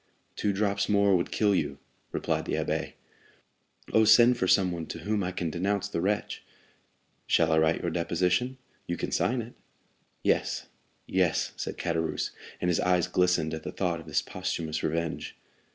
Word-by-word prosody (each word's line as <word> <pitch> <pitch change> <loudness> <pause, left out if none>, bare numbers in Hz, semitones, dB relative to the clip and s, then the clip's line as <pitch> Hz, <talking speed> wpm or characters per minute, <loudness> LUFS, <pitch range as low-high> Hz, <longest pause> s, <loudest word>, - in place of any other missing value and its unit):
"Two 105 - 0
drops 100 0 0
more 100 -1 +4
would 85 - 0
kill 105 -2 +2
you," 95 - -1 0.3
replied - - -1
the - - -3
abbé. - - -1 1.0
"Oh, 110 - +6
send 120 +3 +7
for 95 -6 0
someone 90 -4 +2
to 85 - -6
whom 105 +2 0
I 90 - -2
can 85 -3 -3
denounce 100 +4 -1
the 85 -5 -2
wretch!" 100 +3 -1 0.8
"Shall 80 0 +3
I 80 - +4
write 80 +1 +2
your 85 - -1
deposition? 90 +9 0 0.3
You 85 - -2
can - - -3
sign 125 -1 +1
it." 115 - -12 0.7
"Yes, - - +1 0.4
yes," 90 -3 +1
said - - -5
Caderousse; 80 -2 -1 0.3
and 90 - 0
his 85 - +1
eyes 90 -1 +3
glistened 90 -3 +1
at 80 - -4
the - - -6
thought 90 -3 -1
of 80 - -12
this - - 0
posthumous 80 -2 -3
revenge. 80 0 -2
90 Hz, 170 wpm, -28 LUFS, 85-100 Hz, 1.0 s, send